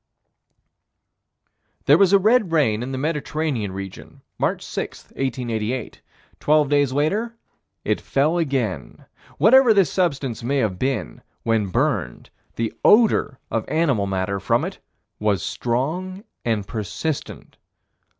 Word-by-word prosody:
There - - +6
was 195 -2 +5
a 200 - +7
red 215 -1 +3
rain 130 -9 +2
in 125 +2 -4
the 130 - -3
Mediterranean 150 - -2
region, 95 0 -9 0.2
March - - -1
6, - - -5
1888. 125 -2 -3 0.4
Twelve 150 -1 +3
days 145 -2 +2
later, 200 - 0 0.5
it - - 0
fell 155 +5 +1
again. 125 - -2 0.3
Whatever 245 0 +6
this 190 -7 +3
substance 140 - -1
may 135 +4 -1
have 105 -8 0
been, 130 -8 -2 0.2
when 115 -3 +1
burned, 110 - -1 0.2
the 115 -1 -2
odor 215 - +4
of 115 - 0
animal 140 -11 +1
matter 95 +1 -2
from - - +1
it - - -7 0.4
was 105 -5 0
strong 170 - -2 0.2
and 110 -4 -1
persistent. 115 - -5
135 Hz, 120 wpm, -22 LUFS, 110-160 Hz, 0.5 s, a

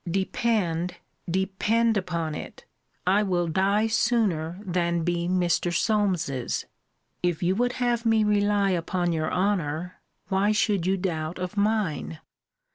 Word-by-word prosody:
Depend, 185 -2 0 0.3
depend 205 +5 +1
upon 170 -5 -2
it, - - -8 0.4
I 195 +3 +4
will 180 -4 +1
die 195 +6 +2
sooner 210 -8 +1
than 170 -2 0
be 175 0 -1
Mr. 175 -1 +1
Solmes's. 180 - 0 0.6
If 175 -1 0
you 180 +2 +2
would 245 +1 +1
have 240 -2 0
me 225 -2 +3
rely 205 -1 +2
upon 175 0 0
your 155 -1 -1
honour, 180 -3 -1 0.3
why 200 +2 +2
should 205 -4 +1
you 190 +1 +2
doubt 165 -3 -3
of 180 +1 -4
mine? 205 -7 0
185 Hz, 125 wpm, -26 LUFS, 170-210 Hz, 0.6 s, I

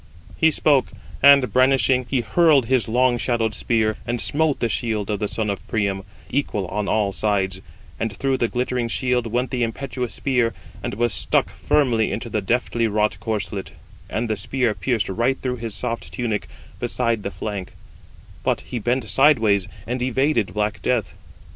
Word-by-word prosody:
He 160 - +4
spoke; 145 -3 +3 0.3
and 140 -2 +6
brandishing, 130 -1 +3
he 130 -3 +1
hurled 155 -2 +4
his 125 -3 +2
long 120 +1 +2
shadowed 115 -3 0
spear, 110 -1 0
and 120 0 -1
smote 150 +2 +1
the 120 - +1
shield 110 -2 -1
of 105 - -1
the 105 - -1
son 110 +1 -2
of 100 -1 -4
Priam, 100 -3 0 0.3
equal 120 -7 -1
on 105 -1 -2
all 105 -3 +1
sides; 95 -3 0 0.4
and 115 -1 -1
through 135 +6 0
the 120 - +1
glittering 125 0 -1
shield 125 0 0
went 120 +2 -1
the 125 - -1
impetuous 125 +1 -3
spear, 125 -4 +1 0.3
and - - -4
was 120 0 +1
stuck - - +1
firmly 120 -7 +1
into 115 +2 -4
the 105 - 0
deftly 115 +2 0
wrought 105 0 +1
corslet: 100 -3 -3 0.4
and 115 +2 -1
the 110 - 0
spear 120 +3 0
pierced 120 -2 -1
right 120 +7 0
through 125 -1 -2
his 115 -3 -5
soft 115 +3 -4
tunic 115 -5 -2 0.3
beside 115 -3 0
the 100 - -3
flank: 100 -2 -5 0.7
but - - +1
he 120 - -5
bent 120 +2 0
sideways, 110 -5 +4 0.2
and 125 +1 -3
evaded 130 -2 +1
black 105 0 -1
death. 125 -4 0
115 Hz, 170 wpm, -22 LUFS, 105-130 Hz, 0.7 s, and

